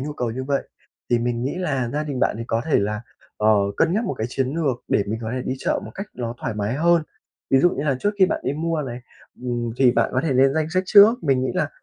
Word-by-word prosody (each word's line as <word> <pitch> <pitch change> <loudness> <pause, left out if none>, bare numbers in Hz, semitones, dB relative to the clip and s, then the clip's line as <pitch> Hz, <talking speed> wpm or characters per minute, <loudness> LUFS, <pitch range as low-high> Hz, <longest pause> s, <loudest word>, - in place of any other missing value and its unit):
nhu 145 +3 -4
cầu 125 -5 -2
như 130 +3 -4
vậy, 140 0 -1 0.4
thì 120 - +4
mình 120 0 -1
nghĩ 135 - -2
là 140 -9 -1
gia 150 - -1
đình 140 -4 -4
bạn - - +2
thì 115 - -4
có 115 0 0
thể 160 - +2
là, 105 +1 -1 0.4
ờ, 105 0 +2 0.3
cân 165 +1 +2
nhắc 220 +4 0
một 190 - -2
cái 110 - -3
chiến 135 0 0
lược 140 -7 -1
để - - +2
mình 110 +2 -3
có 110 - -3
thể 130 - -3
đi 130 - -2
chợ - - -1
một - - -8
cách 195 +1 -5
ló 120 -1 -5
thoải 110 - -3
mái 105 +3 -2
hơn. 170 +2 +3 0.5
Ví 135 - +5
dụ 175 +6 +4
như 140 - -3
là 140 -3 +1
trước 205 - +2
khi 190 - +6
bạn 195 - -2
đi - - 0
mua 160 +1 -1
này, 125 -3 -5 0.4
ừm, 120 -2 -2
thì 130 -1 +5
bạn - - +1
có 130 - +1
thể 150 0 -1
lên 135 +1 +4
danh 155 -1 +1
sách 185 +2 +1
trước. 220 +6 +7
Mình 130 -3 +2
nghĩ - - -1
là - - 0
135 Hz, 285 wpm, -22 LUFS, 120-160 Hz, 0.5 s, trước